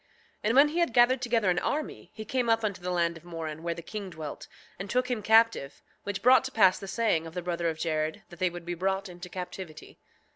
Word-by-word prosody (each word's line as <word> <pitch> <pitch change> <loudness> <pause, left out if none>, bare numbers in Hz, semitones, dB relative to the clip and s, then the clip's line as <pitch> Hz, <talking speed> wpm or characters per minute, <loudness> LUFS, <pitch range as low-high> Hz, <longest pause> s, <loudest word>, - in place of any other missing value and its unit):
7:5 - - -36 0.4
And 225 +3 +2
when 280 +2 +8
he 330 +3 -2
had 340 -8 +1
gathered 245 +2 +5
together 230 -6 +2
an 175 - +1
army 300 +1 -3
he 215 - -7
came 245 +1 -1
up 225 0 +3
unto 200 -4 -2
the 180 - -4
land 170 -2 0
of 165 - -16
Moron 160 -3 -6
where 170 0 -2
the 170 - -8
king 205 +2 -6
dwelt, 155 -4 -7 0.3
and 195 +2 -6
took 250 +2 0
him 235 -3 -1
captive, 220 -10 +3 0.2
which 205 -1 -4
brought 255 +2 +7
to 265 - -4
pass 190 -6 +4
the 195 - -8
saying 195 -6 0
of 165 - -11
the 180 - -3
brother 170 -1 -1
of 160 - -4
Jared 155 -1 -2
that 175 - -13
they 185 - +2
would 175 0 -9
be 175 - -3
brought 190 +3 -1
into 180 0 -9
captivity. 180 -3 -8
185 Hz, 250 wpm, -28 LUFS, 170-225 Hz, 0.4 s, when